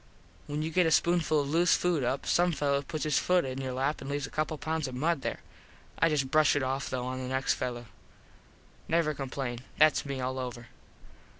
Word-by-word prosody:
When 150 Hz, +1 st, -2 dB
you 160 Hz, -, -3 dB
get 180 Hz, 0 st, +3 dB
a -, -, +1 dB
spoonful 165 Hz, -3 st, +3 dB
of 140 Hz, -, -4 dB
loose 170 Hz, +2 st, +4 dB
food 175 Hz, -6 st, +1 dB
up 130 Hz, +3 st, -1 dB
some 175 Hz, 0 st, +3 dB
fello 140 Hz, -2 st, +1 dB
puts 155 Hz, +2 st, -5 dB
his 150 Hz, -3 st, +2 dB
foot 180 Hz, -3 st, +2 dB
in 130 Hz, 0 st, -4 dB
your 130 Hz, -1 st, -3 dB
lap 135 Hz, +4 st, -1 dB
and 135 Hz, -, -6 dB
leaves 145 Hz, -1 st, -2 dB
a -, -, -10 dB
couple 155 Hz, +1 st, -1 dB
of -, -, -15 dB
pounds 160 Hz, -2 st, -1 dB
of 130 Hz, -, -6 dB
mud 155 Hz, +2 st, 0 dB
there. -, -, -4 dB, 0.6 s
I 165 Hz, -, +4 dB
just 135 Hz, -4 st, 0 dB
brush 155 Hz, -1 st, +4 dB
it 145 Hz, -, +1 dB
off 135 Hz, +1 st, -2 dB
tho 125 Hz, -1 st, -3 dB
on 130 Hz, 0 st, -3 dB
the 130 Hz, -, -4 dB
next 130 Hz, +1 st, +1 dB
fello. 120 Hz, -1 st, -4 dB, 1.0 s
Never 165 Hz, -2 st, +2 dB
complain. 135 Hz, -3 st, -4 dB, 0.2 s
Thats 155 Hz, 0 st, +5 dB
me 140 Hz, -2 st, -4 dB
all 130 Hz, +1 st, -2 dB
over. 120 Hz, -2 st, -6 dB
140 Hz, 220 wpm, -29 LUFS, 130-155 Hz, 1.0 s, Thats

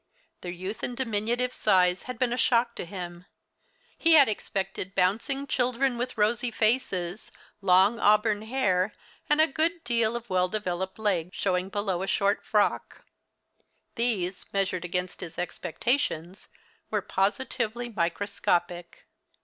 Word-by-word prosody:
Their 175 Hz, -, -5 dB
youth 185 Hz, +4 st, -6 dB
and 245 Hz, -, -4 dB
diminutive 240 Hz, +1 st, -1 dB
size 180 Hz, -5 st, +3 dB
had 250 Hz, -, -4 dB
been 245 Hz, 0 st, +1 dB
a -, -, 0 dB
shock 235 Hz, -1 st, +2 dB
to -, -, -4 dB
him. 175 Hz, -1 st, -8 dB, 0.7 s
He 330 Hz, 0 st, +4 dB
had 290 Hz, -4 st, +8 dB
expected 195 Hz, -2 st, -4 dB
bouncing 225 Hz, +10 st, +1 dB
children 255 Hz, 0 st, +1 dB
with 245 Hz, +1 st, -4 dB
rosy 220 Hz, +3 st, +2 dB
faces, 215 Hz, -5 st, 0 dB, 0.3 s
long 195 Hz, +4 st, +4 dB
auburn 210 Hz, 0 st, +3 dB
hair, 215 Hz, -5 st, 0 dB, 0.4 s
and 295 Hz, +1 st, +4 dB
a 315 Hz, -, +7 dB
good 325 Hz, +3 st, -1 dB
deal 230 Hz, -1 st, +1 dB
of 235 Hz, -1 st, -5 dB
well 185 Hz, -1 st, +2 dB
developed 190 Hz, -2 st, -3 dB
leg 190 Hz, -6 st, 0 dB
showing 185 Hz, -1 st, -1 dB
beneath 195 Hz, -3 st, -1 dB
a 190 Hz, -, -3 dB
short 200 Hz, 0 st, +1 dB
frock. 210 Hz, -1 st, 0 dB, 0.9 s
These, 205 Hz, -7 st, -1 dB
measured 185 Hz, -3 st, -1 dB
against 180 Hz, +1 st, -3 dB
his 170 Hz, -, -8 dB
expectations, 180 Hz, -, -2 dB, 0.4 s
were -, -, -1 dB
positively 235 Hz, +3 st, -1 dB
microscopic. 175 Hz, -2 st, -1 dB
205 Hz, 135 wpm, -27 LUFS, 185-240 Hz, 0.9 s, had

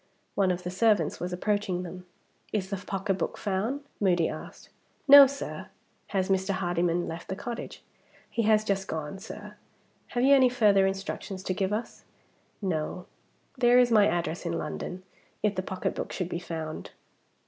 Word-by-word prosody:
One 195 Hz, -2 st, +2 dB
of 180 Hz, 0 st, -1 dB
the 180 Hz, -, -4 dB
servants 210 Hz, +2 st, +2 dB
was 180 Hz, +1 st, -3 dB
approaching 185 Hz, -1 st, -1 dB
them. 180 Hz, +1 st, -9 dB, 0.4 s
"Is 200 Hz, -2 st, -2 dB
the 200 Hz, -, -1 dB
pocketbook 195 Hz, 0 st, -2 dB
found?" 210 Hz, +8 st, -1 dB, 0.2 s
Moody 180 Hz, -5 st, +3 dB
asked. -, -, -8 dB, 0.4 s
"No, 280 Hz, 0 st, +11 dB
sir." 280 Hz, +1 st, -6 dB, 0.4 s
"Has 190 Hz, -2 st, 0 dB
Mr. 190 Hz, 0 st, +1 dB
Hardyman 175 Hz, -1 st, 0 dB
left 165 Hz, +1 st, -6 dB
the 190 Hz, -, -3 dB
cottage?" 235 Hz, +3 st, -6 dB, 0.4 s
"He 235 Hz, -, -1 dB
has 215 Hz, -1 st, +4 dB
just 195 Hz, -2 st, -1 dB
gone, 160 Hz, +4 st, -4 dB
sir. 210 Hz, -, -9 dB, 0.5 s
Have 245 Hz, -1 st, -1 dB
you 275 Hz, +2 st, +6 dB
any 260 Hz, -2 st, +6 dB
further 205 Hz, -5 st, +4 dB
instructions 195 Hz, 0 st, -4 dB
to 185 Hz, -, -1 dB
give 190 Hz, +1 st, -1 dB
us?" 215 Hz, +3 st, -4 dB, 0.6 s
"No. 175 Hz, 0 st, -2 dB, 0.5 s
There 245 Hz, -1 st, +5 dB
is 245 Hz, -1 st, +5 dB
my 210 Hz, -2 st, +6 dB
address 170 Hz, 0 st, -1 dB
in 170 Hz, -1 st, -2 dB
London, 180 Hz, +4 st, -5 dB, 0.4 s
if 210 Hz, -1 st, +2 dB
the 185 Hz, -, -2 dB
pocketbook 185 Hz, 0 st, -3 dB
should 180 Hz, -2 st, -3 dB
be 170 Hz, -, -3 dB
found." 160 Hz, -3 st, -6 dB
190 Hz, 160 wpm, -28 LUFS, 180-215 Hz, 0.6 s, No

